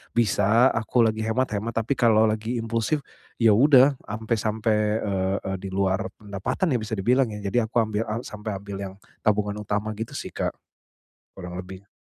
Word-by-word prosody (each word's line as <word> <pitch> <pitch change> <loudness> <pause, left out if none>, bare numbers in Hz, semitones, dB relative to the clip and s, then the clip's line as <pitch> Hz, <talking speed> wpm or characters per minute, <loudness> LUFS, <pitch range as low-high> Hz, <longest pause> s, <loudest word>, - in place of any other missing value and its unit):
bisa 115 +2 +4
aku 115 +1 +2
lagi 110 0 0
hemat-hemat. 115 -2 -1
Tapi 115 +4 +1
kalau 110 -2 +5
lagi 110 +3 -2
impulsif, 115 +5 -1 0.4
iya 115 -2 +6
sudah 135 +2 +6
sampe-sampe, 110 +1 -1 0.3
eee, 95 -1 -1
di 95 - -5
luar 95 -1 0
pendapatan, 105 - -2
ya, - - +1
bisa 110 +1 -5
dibilang, 125 +6 +3
ya. 105 - -6
Jadi 110 +5 +2
aku 110 +2 0
ambil 110 0 -1
a 115 +2 -2
sampai 105 0 -5
ambil 100 0 -7
yang 95 -1 -5 0.3
tabungan 105 -1 +1
utama 105 +1 -2
gitu, 115 +1 -5
sih, - - -6
Kak. - - -1 0.8
Kurang 90 -1 -7
lebih. 95 +2 -10
110 Hz, 165 wpm, -25 LUFS, 100-115 Hz, 0.8 s, iya